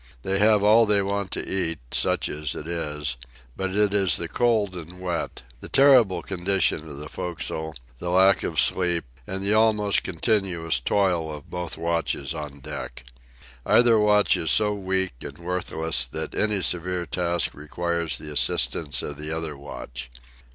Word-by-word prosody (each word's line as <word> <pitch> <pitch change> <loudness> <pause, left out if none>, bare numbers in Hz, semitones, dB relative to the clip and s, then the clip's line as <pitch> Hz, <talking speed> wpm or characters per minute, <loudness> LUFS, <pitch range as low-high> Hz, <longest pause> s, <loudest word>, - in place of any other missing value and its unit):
They 95 +1 0
have 105 -1 +4
all 110 +2 +6
they 100 -1 +3
want 100 0 -2
to - - -2
eat, 85 -4 0
such - - +1
as 75 -1 -4
it 75 - -7
is, 75 -6 -3 0.4
but 95 0 -2
it 105 -1 +2
is 95 -4 +4
the 85 - -3
cold 110 -3 +1
and 90 +1 -9
wet, 85 -7 -4 0.2
the - - -10
terrible 125 -11 +5
condition 95 -4 0
of 70 - -8
the 75 +1 -7
forecastle, 80 -2 -5 0.2
the 90 - -4
lack 95 +2 +4
of - - -1
sleep, 90 -2 +2 0.2
and 95 +1 -4
the 100 +2 +2
almost 110 -2 +3
continuous 85 - 0
toil 85 +1 0
of 75 -2 -10
both 90 -1 -3
watches 85 -3 -1
on 75 -3 -7
deck. 75 -3 -7 0.6
Either 120 - +5
watch 105 -1 +4
is 80 - -2
so 105 +3 +3
weak 95 -3 -1
and - - -8
worthless 80 -6 -1
that - - -5
any 105 -2 +1
severe 90 +1 0
task 85 -1 0
requires 85 +2 -2
the 75 - -8
assistance 75 +1 0
of 75 - -5
the 75 +1 -5
other 80 -2 -4
watch. 65 -3 -8
90 Hz, 165 wpm, -24 LUFS, 80-100 Hz, 0.6 s, all